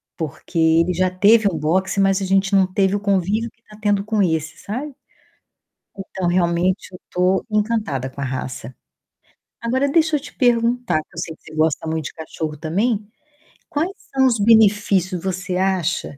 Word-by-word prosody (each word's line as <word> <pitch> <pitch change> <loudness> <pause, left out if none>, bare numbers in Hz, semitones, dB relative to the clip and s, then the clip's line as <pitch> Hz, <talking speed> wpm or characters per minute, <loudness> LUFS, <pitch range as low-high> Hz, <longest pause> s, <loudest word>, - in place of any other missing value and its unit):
porque 160 +2 -6
ele 165 +2 +3
já 185 +1 +1
teve 205 +4 +4
um 165 - -4
boxer, 185 +6 +1
mas 195 0 +2
a - - -1
gente 195 +1 +2
não 190 -1 +3
teve 195 +1 +2
o - - -1
convívio 200 +3 0
que 230 - -40
tá 210 - -16
tendo 205 -1 +1
com 215 -1 0
esse, 160 -2 -1
sabe? 260 +7 -5 1.0
Então, 190 -2 -3
realmente 175 +2 +1
eu 180 - -11
tô 180 +1 +1
encantada 210 - -1
com 135 - -10
a - - -1
raça. 130 -2 -5 0.9
Agora 255 +4 0
deixa 315 +1 +3
eu - - -3
te 295 - -11
perguntar 240 - +2
que - - -33
eu - - -10
sei 160 - -4
que - - -39
você 155 - -13
gosta 155 0 +1
muito 160 -1 -2
de - - -6
cachorro 160 -1 -5
também, 200 - -1 0.6
quais 320 +6 -1 0.2
são 265 0 +3
os 235 -3 +2
benefícios, 200 -4 +3
você 185 -1 -3
acha 185 -5 -1
190 Hz, 180 wpm, -20 LUFS, 165-215 Hz, 1.0 s, teve